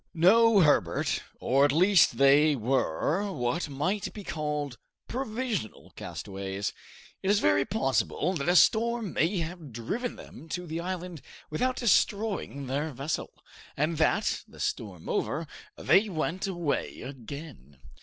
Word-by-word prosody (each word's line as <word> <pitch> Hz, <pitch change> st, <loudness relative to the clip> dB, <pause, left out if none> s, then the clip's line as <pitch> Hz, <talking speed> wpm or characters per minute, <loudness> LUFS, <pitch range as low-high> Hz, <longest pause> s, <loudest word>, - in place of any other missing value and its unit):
"No, 210 Hz, +5 st, +6 dB
Herbert; 145 Hz, -, +2 dB, 0.2 s
or, 135 Hz, +2 st, +3 dB
at 145 Hz, -, +4 dB
least, 185 Hz, +5 st, +4 dB
they 145 Hz, +2 st, +5 dB
were 135 Hz, -, 0 dB
what 125 Hz, +2 st, -2 dB
might 185 Hz, +8 st, -2 dB
be 210 Hz, -, -7 dB
called 150 Hz, -6 st, -3 dB, 0.3 s
provisional 235 Hz, -, -4 dB
castaways. 95 Hz, 0 st, -5 dB, 0.5 s
It 190 Hz, -, -1 dB
is 205 Hz, -, +5 dB
very 100 Hz, 0 st, +3 dB
possible 180 Hz, -, 0 dB
that 150 Hz, -2 st, -1 dB
a 175 Hz, -, +3 dB
storm 230 Hz, +1 st, +3 dB
may 180 Hz, +5 st, +1 dB
have 165 Hz, -3 st, -7 dB
driven 165 Hz, -, -3 dB
them 160 Hz, -, -12 dB
to 180 Hz, +2 st, -4 dB
the 165 Hz, 0 st, -4 dB
island 180 Hz, -2 st, -5 dB, 0.3 s
without 255 Hz, +12 st, 0 dB
destroying 205 Hz, -, +1 dB
their 140 Hz, +4 st, -2 dB
vessel, 140 Hz, +3 st, -3 dB, 0.5 s
and 155 Hz, +2 st, 0 dB
that, 160 Hz, -, +2 dB
the -, -, -16 dB
storm 95 Hz, -6 st, -4 dB
over, 160 Hz, +3 st, -1 dB, 0.3 s
they 205 Hz, +2 st, +3 dB
went 180 Hz, +2 st, -2 dB
away 175 Hz, -6 st, -2 dB
again." 130 Hz, -, -9 dB
160 Hz, 135 wpm, -28 LUFS, 135-195 Hz, 0.5 s, No